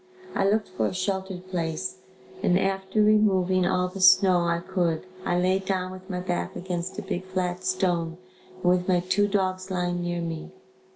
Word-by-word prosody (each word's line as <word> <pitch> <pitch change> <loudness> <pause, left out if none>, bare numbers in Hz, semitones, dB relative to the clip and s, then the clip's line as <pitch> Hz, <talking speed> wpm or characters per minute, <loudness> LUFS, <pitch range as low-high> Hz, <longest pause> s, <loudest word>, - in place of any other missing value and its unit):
I 195 0 +2
looked 215 +1 +1
for 185 - -1
a - - -4
sheltered 190 -1 -3
place 170 +1 -2 0.4
and 180 - +3
after 195 +2 +1
removing 190 -4 +3
all 180 0 +1
the 185 +1 -7
snow 185 -1 +6
I 170 0 +2
could 175 -2 -1 0.2
I 175 - +1
lay 185 +2 +2
down 185 -1 -2
with 185 +1 -11
my 180 -1 -2
back 180 -1 -3
against 180 +1 -4
a 210 - -4
big 190 -2 -3
flat 185 -1 -3
stone 175 -3 0 0.4
and 185 - -17
with 180 0 +3
my 180 -2 +3
two 200 +3 +2
dogs 185 -2 -1
lying 175 -1 -1
near 175 0 -2
me. 165 -1 -5
185 Hz, 180 wpm, -26 LUFS, 175-190 Hz, 0.4 s, snow